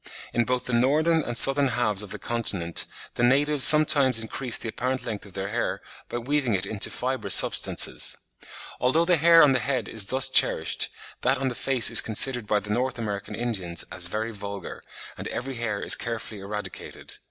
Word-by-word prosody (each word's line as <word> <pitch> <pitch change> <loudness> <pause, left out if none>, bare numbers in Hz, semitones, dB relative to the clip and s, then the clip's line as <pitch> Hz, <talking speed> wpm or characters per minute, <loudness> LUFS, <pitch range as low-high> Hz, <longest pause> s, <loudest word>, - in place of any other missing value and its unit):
In 120 0 -1
both 125 +1 -3
the 125 - -5
Northern 155 +7 +1
and 120 -4 -6
Southern 135 +3 +3
halves 115 -5 0
of 105 - -7
the - - -8
continent 100 -8 -3 0.3
the - - -6
natives 140 +3 +2
sometimes 145 -5 +6
increase 115 +2 -2
the 115 - -6
apparent 130 +3 -5
length 110 -3 -7
of 95 - -18
their 95 +1 -6
hair 120 +3 -4 0.3
by - - -5
weaving 130 -2 -2
into 100 +3 -5 0.2
it - - -14
fibrous 130 +1 +1
substances. - - +3 0.6
Although 150 +7 0
the 175 -1 +2
hair 165 +1 +5
on 145 - +3
the 130 - 0
head 125 -3 -4
is 105 -3 +1
thus 130 +3 +4
cherished, - - +1 0.3
that 135 +2 0
on 135 0 -3
the - - -6
face 125 -1 +4
is 115 - +8
considered 120 +1 +1
by 105 -1 0
the 105 +1 -9
North 125 +2 -3
American 105 -2 -7
Indians 95 -9 -3
"as 90 -1 -2
very 110 +4 -5
vulgar," 100 -2 -10 0.4
and - - -7
every 135 +2 -6
hair 110 -4 -4
is - - +7
carefully 115 -2 -7
eradicated. 105 +1 -8
120 Hz, 190 wpm, -23 LUFS, 105-135 Hz, 0.6 s, is